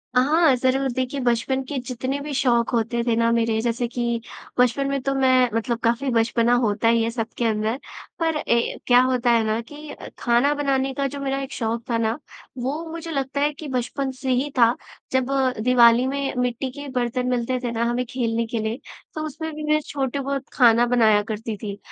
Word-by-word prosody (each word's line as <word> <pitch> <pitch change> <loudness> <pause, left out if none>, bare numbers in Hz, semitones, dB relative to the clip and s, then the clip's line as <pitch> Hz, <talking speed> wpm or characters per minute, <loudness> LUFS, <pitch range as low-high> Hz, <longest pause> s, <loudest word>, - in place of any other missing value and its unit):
हाँ, 290 +3 +4
ज़रूर। 260 +2 +1
देखिए 260 +2 -2
बचपन 245 +2 +1
के 275 +2 -5
जितने 260 +2 -3
भी 290 +1 -5
शौक 240 -3 +2
होते 235 0 0
थे 235 - +3
ना 230 0 +2
मेरे, 230 -1 +1
जैसे 240 +1 -1
कि 235 -1 -2 0.4
बचपन 250 +3 +3
में 275 -1 -1
तो 275 +1 -1
मैं 255 -2 +4
मतलब 230 +1 -1
काफ़ी 240 +4 +1
बचपना 230 +1 +2
होता 210 +1 +1
ही 230 0 +4
है 225 - 0
सबके 230 0 -3
अंदर। 220 +1 0 0.4
पर 325 -2 +1
ए, 235 -5 0
क्या 245 0 +6
होता 255 -1 +2
है 230 -1 +3
ना 215 +1 0
कि 295 +5 -10 0.2
खाना 240 +5 +3
बनाने 270 -2 0
का 275 +1 -2
जो 280 +1 -7
मेरा 275 0 -2
एक 270 0 -6
शौक 230 0 -2
था 230 - +1
ना 225 0 0 0.4
वो 280 +6 -2
मुझे 330 0 -6
लगता 275 -1 -2
है 295 +1 +2
कि 300 +1 -9
बचपन 265 +1 -2
से 260 +1 -6
ही 255 +3 +1
था। 235 0 +5 0.4
जब 260 -1 +2 0.4
दिवाली 245 0 +5
में 275 0 -2
मिट्टी 250 +1 -1
के 285 +2 -8
बर्तन 250 0 -1
मिलते 250 +1 0
थे 240 - -1
ना 230 0 -1
हमें 245 +1 -1
खेलने 230 -3 -1
के 230 0 -3
लिए 220 +3 -3 0.3
तो 310 - -4
उसमें 315 +2 -5
भी 305 - -6
मैं 305 - +4
छोटे 275 -1 -2
बहुत 275 0 -3
खाना 235 -2 +5
बनाया 220 -4 +4
करती 220 +1 -4
थी। 200 -1 -6
250 Hz, 205 wpm, -23 LUFS, 230-275 Hz, 0.4 s, क्या